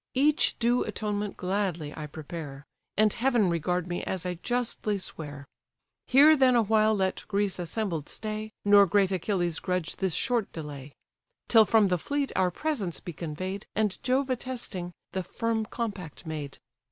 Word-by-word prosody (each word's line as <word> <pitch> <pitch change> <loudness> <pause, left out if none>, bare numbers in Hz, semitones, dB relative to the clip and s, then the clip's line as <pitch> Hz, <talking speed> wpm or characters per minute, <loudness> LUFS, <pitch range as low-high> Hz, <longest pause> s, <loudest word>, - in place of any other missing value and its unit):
Each 295 +3 +3
due 240 +1 +2
atonement 210 -1 -3
gladly 180 -5 -2
I 150 -1 -6
prepare; 150 -2 -8 0.3
And 215 0 +4
heaven 235 -7 +2
regard 175 +1 0
me 175 -1 -3
as 185 -1 -3
I 180 - -1
justly 240 -4 -1
swear! 145 -6 -6 0.6
Here 290 +4 +7
then 260 -3 +5
awhile 220 -1 +4
let 190 -2 -1
Greece 200 -2 0
assembled 175 -3 -2
stay, 215 0 -4
Nor 200 -1 +7
great 195 +1 +3
Achilles 175 -3 0
grudge 180 -3 -2
this 190 -4 0
short 240 -5 0
delay. 145 -3 -7 0.6
Till 225 -2 +7
from 220 0 +4
the 180 -1 +1
fleet 285 - -1
our 185 -1 +3
presents 210 - -2
be 175 - -7
convey'd, 185 +6 -5
And 210 -2 0
Jove 260 +1 +1
attesting, 235 -8 -3 0.2
the 190 - -2
firm 225 +4 -2
compact 200 -11 -5
made. 150 -3 -5
195 Hz, 155 wpm, -28 LUFS, 175-225 Hz, 0.6 s, Here